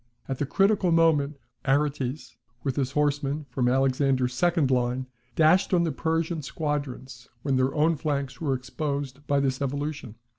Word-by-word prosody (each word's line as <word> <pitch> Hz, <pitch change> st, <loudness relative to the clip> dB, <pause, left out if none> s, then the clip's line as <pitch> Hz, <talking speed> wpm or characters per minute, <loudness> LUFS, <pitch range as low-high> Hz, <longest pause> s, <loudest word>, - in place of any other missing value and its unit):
At 135 Hz, -1 st, -3 dB
the 145 Hz, -, -1 dB
critical 195 Hz, +1 st, +3 dB
moment, 155 Hz, -3 st, +3 dB, 0.3 s
Aretes, 135 Hz, -2 st, -1 dB, 0.3 s
with 135 Hz, -3 st, -1 dB
his 135 Hz, -1 st, -1 dB
horsemen 145 Hz, 0 st, 0 dB
from 125 Hz, -1 st, +1 dB
Alexander's 130 Hz, -1 st, +2 dB
second 165 Hz, -1 st, +2 dB
line, 125 Hz, +1 st, +1 dB, 0.3 s
dashed 175 Hz, +4 st, +4 dB
on 170 Hz, -, +3 dB
the 165 Hz, -, 0 dB
Persian 165 Hz, +3 st, -1 dB
squadrons 135 Hz, -4 st, -4 dB
when 140 Hz, -2 st, +1 dB
their 130 Hz, +1 st, +1 dB
own 160 Hz, +2 st, +3 dB
flanks 140 Hz, 0 st, -3 dB
were 140 Hz, -4 st, +1 dB
exposed 140 Hz, +1 st, -4 dB
by 140 Hz, -1 st, +2 dB
this 135 Hz, -1 st, 0 dB
evolution. 140 Hz, -3 st, -3 dB
140 Hz, 150 wpm, -26 LUFS, 130-155 Hz, 0.3 s, dashed